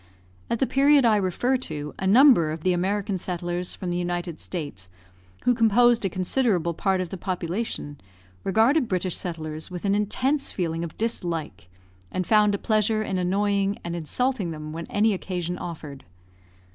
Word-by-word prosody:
At 235 - 0
the 265 - +2
period 275 0 +4
I 225 -2 +5
refer 205 +7 +1
to, 150 - -6
a 190 - -1
number 230 - +6
of 155 0 -5
the 185 +2 +2
American 195 +2 -1
settlers 175 0 -3
from 180 -2 -4
the 175 - -1
United 175 -2 -3
States, 145 - -6 0.5
who 245 - +4
composed 230 +1 +4
a 195 - +1
considerable 185 -2 0
part 190 +2 0
of 180 - -4
the 190 - -6
population, 180 -4 -4 0.4
regarded 235 - +3
British 185 -2 0
settlers 155 -3 -5
with 180 +1 -6
an 200 - +2
intense 260 +8 0
feeling 165 -2 -2
of 170 - -7
dislike, 165 - -3 0.4
and 185 - -2
found 210 0 +4
a - - -2
pleasure 215 +1 +1
in 190 -3 -2
annoying 200 +2 +1
and 170 0 -4
insulting 200 - -1
them 155 -1 -6
when 165 +1 -6
any 215 +1 +2
occasion 180 -2 -4
offered. 155 -5 -7
185 Hz, 165 wpm, -25 LUFS, 170-215 Hz, 0.5 s, number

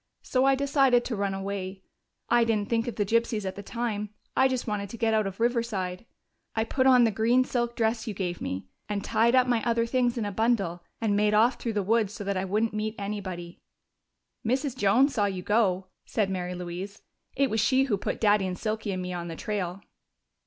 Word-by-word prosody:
So 255 0 +1
I 270 0 +5
decided 270 -3 +3
to 235 - -2
run 200 -1 -1
away. 195 -1 -5 0.4
I 240 0 +4
didn't 215 -3 0
think 230 0 +1
of 235 - -3
the 205 - 0
gypsies 225 -1 +1
at 190 - -2
the 200 - -6
time: 210 -1 -3 0.3
I 265 - +5
just 255 -2 -2
wanted 205 -2 -3
to 230 - -8
get 225 -1 +1
out 215 -2 +2
of 195 +1 -7
Riverside. 230 -5 -1 0.5
I 220 - +2
put 260 +3 +1
on 250 -2 +7
the 225 - +3
green 230 +5 +3
silk 240 -2 -2
dress 225 +1 0
you 215 - -3
gave 180 -2 -3
me, 95 +1 -4 0.2
and 205 -1 -2
tied 235 +3 +3
up 255 -1 +5
my 240 -3 +1
other 230 -1 +1
things 245 0 +1
in 225 - -1
a 205 - -2
bundle, 200 -5 0 0.2
and 215 -3 +1
made 210 0 +3
off 230 +4 +4
through 230 - -2
the 205 -1 0
woods 215 0 +1
so 205 - -6
that 200 0 -1
I 185 0 -1
wouldn't 215 +4 0
meet 215 +1 -2
anybody." 190 -4 -5 0.8
"Mrs. 260 +3 0
Jones 255 +5 +3
saw 205 - +2
you 190 -2 -3
go," 190 -3 +1 0.2
said 205 -4 0
Mary 180 -1 -3
Louise. 180 +3 -6 0.3
"It 275 0 +2
was 220 - +1
she 260 +5 +3
who 255 -6 +1
put 195 - -3
Daddy 205 -3 +3
and 180 -1 -4
Silky 215 0 -2
and 185 0 -3
me 180 0 -4
on 175 -1 -4
the 165 - -5
trail." 195 -2 -3
215 Hz, 220 wpm, -27 LUFS, 195-235 Hz, 0.8 s, on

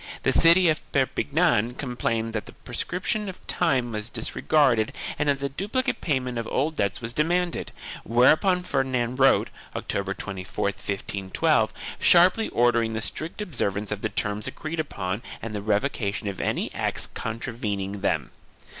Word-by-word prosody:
The - - +3
city 170 +2 +6
of 155 -1 +2
Perpignan 135 -3 +2
complained 115 -4 -2
that 110 - -3
the - - -10
prescription 200 +3 -2
of 185 - -11
time 130 -9 +1
was 105 0 -4
disregarded 125 -2 +2 0.3
and 150 -1 +2
that 140 - +3
the 140 0 -3
duplicate 205 - -2
payment 130 -5 -1
of 115 - -4
old 155 +4 0
debts 100 +2 0
was 115 0 -4
demanded, 175 +5 0 0.3
whereupon 155 - +4
Ferdinand 130 -5 0
wrote, 135 0 +4 0.2
October 100 0 -2
24, 95 -2 -5
1512, 100 -1 0 0.3
sharply 180 +6 +5
ordering 115 -1 +2
the 110 - -1
strict 160 - -2
observance 105 - -2
of 105 -1 -3
the 110 - -1
terms 105 0 -1
agreed 155 +1 -5
upon 100 -9 -3 0.2
and 115 -1 -6
the 105 - -3
revocation 105 0 -1
of 100 - -3
any - - -1
acts - - -1
contravening 105 -4 -3
them. - - 0
120 Hz, 145 wpm, -25 LUFS, 105-155 Hz, 0.3 s, city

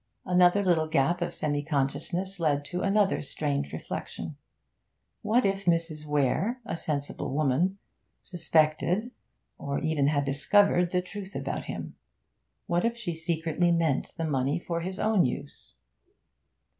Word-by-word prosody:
Another 180 +2 +4
little 165 -4 +2
gap 155 +4 +1
of 175 0 -1
semi 145 -3 -1
consciousness 160 +6 -2
led 145 -3 +1
to 180 +4 -3
another 200 0 +2
strange 140 -1 -2
reflection. - - -6 0.9
What 230 +3 +2
if 195 0 0
Mrs. 165 -3 0
Weare 150 - +1
(a - - -3
sensible 145 -5 -3
woman) 155 +7 +1 0.5
suspected, 175 +6 +1 0.5
or 140 0 -2
even 155 -3 +1
had 145 -1 +1
discovered, 175 +6 +3
the 180 0 0
truth 195 +1 -8
about - - -3
him. - - -6 0.7
What 175 0 +1
if 235 0 0
she 205 -8 -3
secretly 165 +1 0
meant 165 -5 0
the 165 - -1
money 140 0 0
for 170 -1 -3
his 185 +2 -4
own 215 -3 +3
use? 125 - -5
170 Hz, 135 wpm, -28 LUFS, 150-185 Hz, 0.9 s, Another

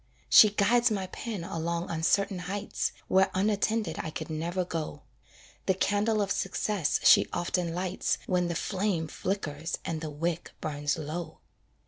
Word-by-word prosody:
She 215 - +9
guides 235 +4 +3
my 200 -3 -1
pen 195 0 -5
along 170 +1 -3
uncertain 185 +4 +1
heights, 195 +3 -2 0.2
Where 190 +1 +4
unattended 210 -1 +1
I - - -3
could 155 - -6
never 170 +4 -2
go; 165 -3 -5 0.6
The 190 - +3
candle 205 +2 +1
of 200 - -3
success 190 -4 0
she - - +7
often 175 -1 -1
lights 185 +1 -1
When 180 -1 +1
the 170 - -2
flame 185 -3 -1
flickers 165 -3 -3
and 160 -2 -3
the 160 - -4
wick 165 +3 -3
burns 145 0 -2
low. 160 +2 -5
180 Hz, 145 wpm, -29 LUFS, 165-200 Hz, 0.6 s, She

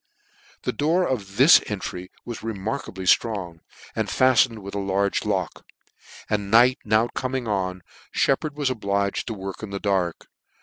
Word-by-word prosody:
The - - -1
door 170 +5 +1
of 100 -6 -4
this 140 +6 +8
entry 95 -3 -5 0.2
was 120 -2 -6
remarkably 110 -2 -4
ftrong, 90 -5 +1 0.4
and - - -1
fattened 125 -4 +3
with 100 - -8
a 100 - -2
large 100 0 0
lock; - - -2 0.6
and 100 -2 -1
night 125 +5 +5
BOW 110 +2 +2
coming 130 -2 -3
on, 95 -3 -2 0.3
*Shep 135 - +2
pard 150 -2 -6
was 140 -3 0
obliged 100 -3 -1
to 115 - -3
work 95 -1 -7
in 110 - -6
the 100 0 -4
dark. 95 -5 -1
105 Hz, 160 wpm, -24 LUFS, 95-125 Hz, 0.6 s, this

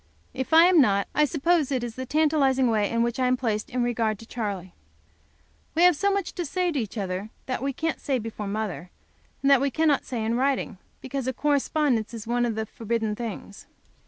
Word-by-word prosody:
If 260 +2 -4
I 325 +1 +8
am 355 -3 +6
not, 200 -5 +2
I 300 - +4
suppose 310 0 +1
it 255 -3 0
is 235 -2 -4
the 260 +2 -6
tantalizing 275 -4 +2
way 210 -2 +1
in 230 0 +1
which 235 +1 -2
I 255 - +2
am 255 0 +2
placed 220 -4 -2
in 250 0 -1
regard 230 -3 0
to 225 - -12
Charley. 200 -6 -5 1.0
We 335 - +4
have 355 -2 +6
so 400 +6 +1
much 395 -2 -2
to 350 - -3
say 355 +3 -1
to 295 - -1
each 225 -1 -5
other 195 +1 -3 0.2
that 255 -2 -3
we 275 +1 -1
can't 320 +4 -3
say 270 -2 0
before 220 -3 -5
mother, 200 -4 -4 0.5
and 275 - +4
that 275 -2 +6
we 280 - +2
cannot 300 0 +1
say 230 -4 -3
in 225 - 0
writing, 260 -5 0 0.2
because 265 -1 -4
a 260 - 0
correspondence 280 -4 0
is 220 - -7
one 240 +1 +1
of 225 - -2
the 220 0 -2
forbidden 225 -1 -2
things. 215 -3 -7
250 Hz, 215 wpm, -25 LUFS, 220-285 Hz, 1.0 s, I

